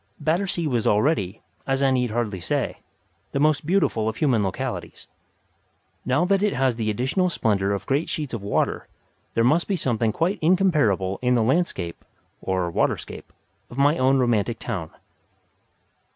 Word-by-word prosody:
Battersea 170 Hz, +3 st, 0 dB
was 120 Hz, -6 st, 0 dB
already, 105 Hz, -, +1 dB, 0.2 s
as 135 Hz, 0 st, +1 dB
I 135 Hz, -, +4 dB
need 125 Hz, -2 st, +1 dB
hardly 110 Hz, -4 st, -2 dB
say, 85 Hz, -, -2 dB, 0.6 s
the 140 Hz, -, 0 dB
most 150 Hz, 0 st, +2 dB
beautiful 155 Hz, -, +1 dB
of 110 Hz, -, -5 dB
human 125 Hz, -7 st, +2 dB
localities. 95 Hz, -, -4 dB, 1.0 s
Now 140 Hz, +7 st, +2 dB
that 195 Hz, +1 st, +2 dB
it 210 Hz, -1 st, +2 dB
has 130 Hz, -2 st, +1 dB
the 110 Hz, -2 st, -2 dB
additional 130 Hz, -, 0 dB
splendour 100 Hz, -, 0 dB
of 100 Hz, -, -3 dB
great 140 Hz, +5 st, 0 dB
sheets 150 Hz, -5 st, -3 dB
of 115 Hz, -, -3 dB
water, 100 Hz, +1 st, -1 dB, 0.5 s
there 115 Hz, -, +3 dB
must 155 Hz, +8 st, +3 dB
be 200 Hz, -, 0 dB
something 120 Hz, -8 st, 0 dB
quite 175 Hz, -, -1 dB
incomparable 150 Hz, -, +2 dB
in 125 Hz, 0 st, +2 dB
the 115 Hz, -, +3 dB
landscape 115 Hz, -, -1 dB, 0.4 s
(or 90 Hz, -2 st, -1 dB
waterscape) -, -, -2 dB, 0.4 s
of 120 Hz, -, -11 dB
my 145 Hz, +2 st, +4 dB
own 130 Hz, +1 st, +4 dB
romantic 120 Hz, -2 st, +1 dB
town. 95 Hz, -11 st, -4 dB
125 Hz, 155 wpm, -24 LUFS, 110-155 Hz, 1.0 s, I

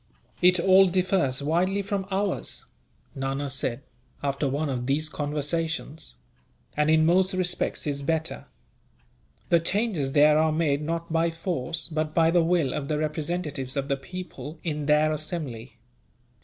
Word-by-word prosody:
"It 180 Hz, 0 st, +6 dB
all 190 Hz, +2 st, +6 dB
differs 180 Hz, -7 st, +1 dB
widely 185 Hz, +6 st, +1 dB
from 195 Hz, -1 st, -3 dB
ours," 195 Hz, 0 st, -2 dB, 0.5 s
Nana 135 Hz, +1 st, -3 dB
said, 130 Hz, -1 st, -2 dB, 0.4 s
after 140 Hz, 0 st, 0 dB
one 145 Hz, +3 st, -1 dB
of 125 Hz, -3 st, -3 dB
these 150 Hz, +3 st, +1 dB
conversations, 150 Hz, -, -3 dB, 0.6 s
"and 150 Hz, +1 st, +2 dB
in 160 Hz, 0 st, +5 dB
most 185 Hz, +3 st, +3 dB
respects 180 Hz, -1 st, -1 dB
is 140 Hz, -1 st, -2 dB
better. 160 Hz, +2 st, -2 dB, 1.0 s
The 170 Hz, -, +5 dB
changes 170 Hz, -, 0 dB
there 150 Hz, +1 st, +6 dB
are 160 Hz, 0 st, +3 dB
made 155 Hz, -2 st, +1 dB
not 165 Hz, +1 st, -3 dB
by 165 Hz, +1 st, +2 dB
force, 165 Hz, -2 st, -3 dB
but 155 Hz, -1 st, -3 dB
by 165 Hz, -1 st, +4 dB
the 175 Hz, -1 st, +4 dB
will 165 Hz, -6 st, +1 dB
of 145 Hz, -2 st, -3 dB
the 150 Hz, -, 0 dB
representatives 150 Hz, -3 st, -3 dB
of 140 Hz, 0 st, -2 dB
the 140 Hz, -, +2 dB
people, 160 Hz, +1 st, -8 dB
in 150 Hz, -3 st, -3 dB
their 155 Hz, +1 st, +4 dB
assembly. 135 Hz, -7 st, -5 dB
155 Hz, 145 wpm, -26 LUFS, 140-175 Hz, 1.0 s, It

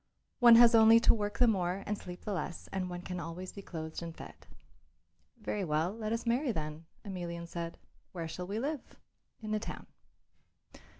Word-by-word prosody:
"One 240 Hz, -2 st, +9 dB
has 235 Hz, 0 st, +8 dB
only 225 Hz, 0 st, +8 dB
to -, -, +6 dB
work 205 Hz, -2 st, -2 dB
the 250 Hz, -, +5 dB
more 190 Hz, -3 st, 0 dB
and 210 Hz, -, -1 dB
sleep 180 Hz, -3 st, -10 dB
the 210 Hz, -, -2 dB
less 175 Hz, -2 st, -4 dB
and 185 Hz, -1 st, -2 dB
one 175 Hz, 0 st, -6 dB
can 180 Hz, -1 st, -5 dB
always 170 Hz, +3 st, -6 dB
be 200 Hz, -, -8 dB
clothed 160 Hz, -4 st, -6 dB
and 165 Hz, -1 st, -7 dB
fed." -, -, -9 dB, 1.1 s
"Very 210 Hz, -2 st, -2 dB
well; 160 Hz, +2 st, 0 dB
let 220 Hz, -1 st, -4 dB
us 230 Hz, +1 st, -2 dB
marry, 245 Hz, +3 st, +1 dB
then," 155 Hz, -3 st, -5 dB, 0.2 s
Emelian 170 Hz, -3 st, -5 dB
said. 170 Hz, 0 st, -5 dB, 0.3 s
"Where 170 Hz, -3 st, -5 dB
shall 180 Hz, +3 st, -6 dB
we 200 Hz, +3 st, -3 dB
live?" 280 Hz, +3 st, -4 dB, 0.5 s
"In 215 Hz, -1 st, -5 dB
the 215 Hz, -, +1 dB
town." -, -, -7 dB
190 Hz, 185 wpm, -32 LUFS, 170-220 Hz, 1.1 s, One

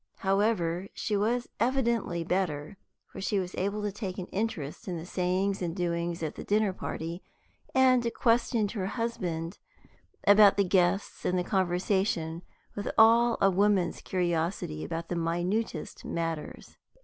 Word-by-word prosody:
However, 195 Hz, -3 st, +1 dB
she 210 Hz, -, -1 dB
was 235 Hz, +4 st, 0 dB
evidently 235 Hz, -8 st, +1 dB
better, 170 Hz, -1 st, -1 dB, 0.3 s
for 195 Hz, -, -10 dB
she 200 Hz, +2 st, 0 dB
was 185 Hz, -1 st, -2 dB
able 200 Hz, +2 st, -2 dB
to 205 Hz, -, -1 dB
take 195 Hz, -2 st, -5 dB
an 185 Hz, -, -4 dB
interest 190 Hz, -9 st, -3 dB
in 180 Hz, -2 st, -3 dB
the 165 Hz, -, -7 dB
sayings 185 Hz, +2 st, 0 dB
and 170 Hz, -1 st, -2 dB
doings 170 Hz, -1 st, -2 dB
at 155 Hz, -, -2 dB
the -, -, -8 dB
dinner 210 Hz, -1 st, +1 dB
party, 170 Hz, 0 st, -5 dB, 0.5 s
and 255 Hz, -2 st, +4 dB
questioned 230 Hz, -3 st, +2 dB
her 195 Hz, -5 st, -3 dB
husband 185 Hz, -7 st, -3 dB, 0.7 s
about 205 Hz, 0 st, +7 dB
the 200 Hz, -, +4 dB
guests 185 Hz, +1 st, +1 dB
and 180 Hz, -, +1 dB
the 180 Hz, -, +1 dB
conversation 180 Hz, -2 st, 0 dB, 0.3 s
with 205 Hz, -, -3 dB
all 230 Hz, +1 st, +6 dB
a 195 Hz, -, +5 dB
woman's 195 Hz, -2 st, +2 dB
curiosity 170 Hz, -, -1 dB
about 165 Hz, -, -4 dB
the 175 Hz, -, -1 dB
minutest 175 Hz, +2 st, -2 dB
matters. 165 Hz, -2 st, -4 dB
190 Hz, 145 wpm, -29 LUFS, 170-210 Hz, 0.7 s, about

